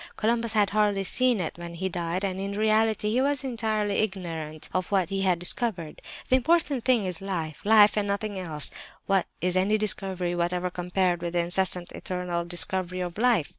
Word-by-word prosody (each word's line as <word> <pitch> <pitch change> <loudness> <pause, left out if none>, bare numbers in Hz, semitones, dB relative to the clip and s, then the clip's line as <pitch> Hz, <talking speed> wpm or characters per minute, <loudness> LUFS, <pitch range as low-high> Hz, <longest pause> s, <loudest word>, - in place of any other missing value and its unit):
Columbus 230 0 0
had 210 -2 +2
hardly 205 -2 +2
seen 250 +3 +2
it 170 -1 -4
when 170 0 -7
he 190 +3 -2
died, 175 +1 -3
and 190 -1 -3
in 200 +1 -3
reality 215 0 +2
he 250 +3 +2
was 280 0 0
entirely 220 -5 -1
ignorant 165 -7 -3
of 185 0 -1
what 190 -3 +1
he 195 0 -1
had 185 -2 +2
discovered. 175 -2 -3 0.3
The 260 - +4
important 290 -2 +1
thing 245 -6 +3
is 180 -2 -1
life—life 195 +4 +3
and 210 -1 0
nothing 200 0 -2
else! 155 -5 +1 0.3
What 195 -2 +1
is 180 0 +1
any 195 +4 +2
'discovery' 190 -4 -1
whatever 175 +1 -1
compared 180 0 0
with 170 0 -4
the 175 - +2
incessant, 180 0 +2
eternal 180 -2 -3
discovery 185 +1 -1
of 175 +2 -5
life? 235 -10 +3
190 Hz, 180 wpm, -26 LUFS, 175-215 Hz, 0.3 s, The